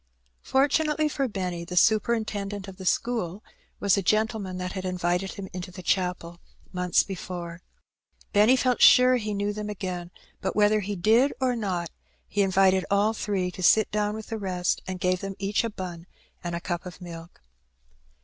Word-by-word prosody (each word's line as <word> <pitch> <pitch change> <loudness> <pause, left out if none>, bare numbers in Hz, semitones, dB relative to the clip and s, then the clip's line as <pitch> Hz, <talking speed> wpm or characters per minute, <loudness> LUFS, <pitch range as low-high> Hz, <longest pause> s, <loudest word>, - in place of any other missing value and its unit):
Fortunately 300 +3 +2
for 275 -2 -1
Benny, 180 -5 -4
the 180 +1 -6
superintendent 210 -2 +1
of 190 -1 -10
the 190 -2 -6
school 215 -5 -1 0.4
was 200 -2 +2
the 200 - +3
gentleman 215 -1 0
that 180 0 -4
had 190 -1 -5
invited 180 +1 -1
him 200 -3 -7
into 180 0 -6
the 185 0 -10
chapel 180 -1 -1 0.3
months 180 -1 +2
before. 175 -2 -6 0.7
Benny 210 +5 +6
felt 250 -1 +1
sure 255 0 +7
he 210 -3 -3
knew 205 +1 -1
them 210 0 -5
again, 185 -4 -5 0.3
but - - -2
whether 210 +1 +4
he 205 0 -3
did 225 +9 +3
or 255 -2 +1
not, 185 -7 -2 0.4
he 205 - 0
invited 190 -1 +3
all 205 +2 +3
three 195 -4 -2
to 185 - -9
sit 215 +4 +4
down 210 0 0
with 220 -1 -8
the 225 - -3
rest, 180 -3 -1
and 185 -1 -4
gave 180 0 +1
them 195 0 -5
each 200 +3 0
a 230 - -1
bun 180 -4 -7 0.4
and 175 -1 -3
a - - -2
cup 175 +1 -4
of 180 - -10
milk. 170 -1 -10
195 Hz, 180 wpm, -26 LUFS, 180-215 Hz, 0.7 s, sure